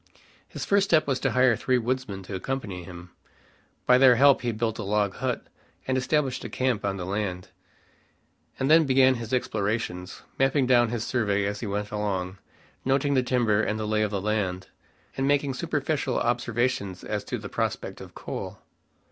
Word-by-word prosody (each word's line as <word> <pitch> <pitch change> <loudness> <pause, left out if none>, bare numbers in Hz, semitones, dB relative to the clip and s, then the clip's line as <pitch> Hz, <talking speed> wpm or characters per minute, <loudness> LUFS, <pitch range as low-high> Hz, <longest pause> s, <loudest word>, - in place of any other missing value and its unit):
His - - -6
first 200 -1 +3
step 155 -2 +4
was 135 -2 0
to - - +1
hire 125 -2 +4
three 130 +3 +1
woodsmen 120 -5 -3
to 95 - -8
accompany 100 -3 -4
him. 85 0 -11 0.7
By 125 0 +5
their 130 -2 +7
help 140 +2 +5
he 120 - -1
built 110 0 -2
a - - -3
log 100 -1 0
hut, - - -2 0.4
and 130 - 0
established 130 +1 0
a - - -5
camp 130 -4 -1
on 100 -1 -1
the 90 - -5
land, 95 -2 -3 1.1
and 130 - 0
then 160 -1 +6
began 130 0 +5
his 115 -3 -6
explorations, 105 -6 -2 0.2
mapping 135 0 +3
down 120 -2 +4
his 120 -1 -2
survey 100 -5 0
as 100 0 -3
he 115 - -4
went 105 +1 -3
along, 95 -3 -3 0.4
noting 135 +2 +1
the 130 - +3
timber, 120 -5 +2
and 110 0 -1
the 110 - -2
lay 110 0 +1
of 105 - +1
the 100 -1 -2
land, 95 -3 -2 0.5
and 135 0 0
making 140 -1 +2
superficial 145 -2 -1
observations 120 -4 -1
as - - -3
to - - -3
the - - -7
prospect - - -3
of - - -12
coal. - - -6
115 Hz, 180 wpm, -26 LUFS, 100-130 Hz, 1.1 s, their